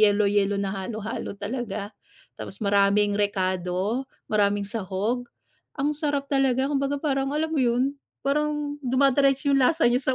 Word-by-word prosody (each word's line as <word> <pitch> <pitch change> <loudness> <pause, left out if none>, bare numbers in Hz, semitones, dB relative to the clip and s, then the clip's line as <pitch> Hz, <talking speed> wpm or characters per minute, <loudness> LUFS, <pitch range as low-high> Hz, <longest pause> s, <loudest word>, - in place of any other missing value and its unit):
yelo-yelo 205 -1 +3
na 200 -1 -1
halo-halo 205 +2 -5
talaga, 210 -1 -4 0.5
tapos - - -7
maraming 200 +1 +3
rekado, 190 +4 -1 0.2
maraming 205 -1 +2
sahog? 210 +4 -2 0.5
Ang 290 +2 +1
sarap 285 -2 -1
talaga, 270 0 +2
kumbaga 275 0 0
parang 275 -1 0
alam 315 +1 0
mo 320 - 0
'yun? 255 +3 +1 0.2
Parang 295 +1 -1
dumideretso 275 +2 +3
'yung 275 - +4
lasa 315 +4 +3
niya 255 +1 +1
245 Hz, 130 wpm, -25 LUFS, 205-275 Hz, 0.5 s, yung